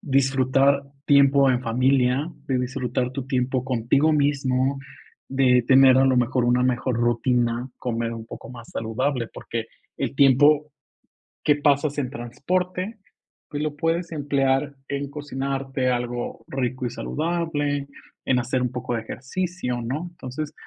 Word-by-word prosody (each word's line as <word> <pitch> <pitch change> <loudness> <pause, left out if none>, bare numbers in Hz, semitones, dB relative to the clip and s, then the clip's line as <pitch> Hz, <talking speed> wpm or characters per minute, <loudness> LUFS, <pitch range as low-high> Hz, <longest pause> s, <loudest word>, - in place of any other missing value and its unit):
disfrutar 135 0 +2 0.2
tiempo 140 -1 +5
en 125 -1 +1
familia, 130 +5 +2 0.2
de 130 -2 0
disfrutar 125 -1 -2
tu 135 -1 -5
tiempo 130 -1 0
contigo 130 +5 +2
mismo, 135 -2 +1 0.5
de 130 -2 +3
tener 130 0 +7
a 135 - +5
lo 130 - +3
mejor 125 0 +2
una 125 +1 +3
mejor 125 -1 0
rutina, 120 +1 +1
comer 115 -1 -2
un 115 -1 -7
poco - - -10
más 120 -2 -11
saludable, 115 +2 -2
porque 115 -1 -5 0.3
el - - -2
tiempo 145 +2 +5 0.7
que 150 - +4
pasas 145 0 +1
en 130 -3 -1
transporte, 180 - -3 0.5
pues 145 0 -4
lo 150 -1 -2
puedes 165 +2 -1
emplear 140 -1 0
en 140 0 -3
cocinarte 135 -2 -2
algo 120 -1 -3
rico 130 -1 -2
y 120 - -1
saludable, 150 -3 -2 0.4
en 125 -1 +2
hacer 125 +1 -1
un 125 - -1
poco 125 -1 -4
de 115 - -2
ejercicio, 135 +1 -4
¿no? 135 +9 -3
Entonces, 150 -1 -6
135 Hz, 140 wpm, -24 LUFS, 125-145 Hz, 0.7 s, tener